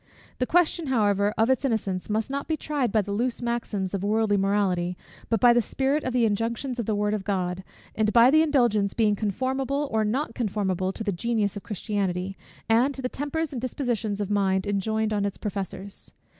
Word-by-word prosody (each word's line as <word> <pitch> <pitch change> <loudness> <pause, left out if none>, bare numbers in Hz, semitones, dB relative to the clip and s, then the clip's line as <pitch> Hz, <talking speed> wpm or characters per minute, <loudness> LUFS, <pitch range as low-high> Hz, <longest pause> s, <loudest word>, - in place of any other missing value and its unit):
The 250 - 0
question, 340 -2 +2
however, 205 -5 +2
of 225 +3 +3
its 260 - +1
innocence, 210 -8 -1
must 220 +4 -1
not 280 0 -3
be 315 - 0
tried 285 -7 -1
by 215 -1 +2
the 200 - -6
loose 235 +4 -1
maxims 230 -5 -2
of 195 -1 -2
worldly 215 0 +2
morality, 190 -3 +1 0.3
but 225 - +2
by 240 +2 +7
the 240 - +4
spirit 270 +6 0
of 255 - -1
the 245 -2 +3
injunctions 230 +4 -1
of 235 - -2
the 215 - +1
word 210 0 0
of 210 -2 -2
God; 185 -2 -2 0.3
and 215 -1 +1
by 235 +3 +6
the 310 +2 +6
indulgence 240 -10 +2
being 215 -3 +3
conformable 265 +7 -1
or 220 0 +2
not 230 +4 -1
conformable 190 -5 -1
to 220 - -6
the 205 - 0
genius 210 +2 -1
of 205 - -5
Christianity, 195 -3 -2 0.3
and 245 +5 +3
to 265 - -6
the 250 - -1
tempers 295 +3 -2
and 245 - -4
dispositions 235 -5 -2
of 205 -1 -2
mind 190 -2 +1
enjoined 215 +2 0
on 205 -1 0
its 200 -1 -2
professors. 195 -1 -5
220 Hz, 200 wpm, -26 LUFS, 200-250 Hz, 0.3 s, by